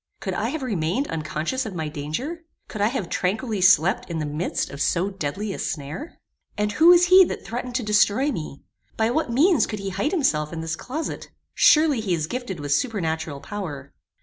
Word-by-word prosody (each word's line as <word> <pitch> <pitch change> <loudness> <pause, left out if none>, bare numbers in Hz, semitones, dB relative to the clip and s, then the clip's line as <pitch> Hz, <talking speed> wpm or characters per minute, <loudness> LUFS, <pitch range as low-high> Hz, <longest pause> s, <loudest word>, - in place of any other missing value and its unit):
Could - - -3
I - - -1
have 315 -3 -4
remained 205 - -1
unconscious 160 - -2
of 200 - -7
my 160 -2 -3
danger? 155 - -4 0.3
Could 215 - -6
I 205 - +4
have 220 -6 -2
tranquilly 205 +4 -1
slept 185 -1 +4
in 170 - -3
the 155 - -2
midst 150 +1 -2
of 140 0 -6
so 180 +7 +1
deadly 195 +3 -4
a - - -7
snare? 150 - -5 0.4
And 210 0 0
who 320 +10 +4
was 350 0 +8
he 370 +2 +8
that - - -6
threatened 245 +1 -5
to 250 - 0
destroy 210 +6 +3
me? 155 - -6 0.3
By 225 +1 +2
what 310 0 0
means 295 - +4
could 215 - -4
he 195 -1 -4
hide 195 +10 -1
himself 160 - 0
in 165 -1 -5
this 165 0 -3
closet? 305 - -5 0.2
Surely 305 -5 +5
he 195 -5 0
is 155 -2 -2
gifted 240 -3 -5
with 145 -1 -4
supernatural 160 - -2
power. 145 -6 -7
200 Hz, 200 wpm, -24 LUFS, 160-255 Hz, 0.4 s, was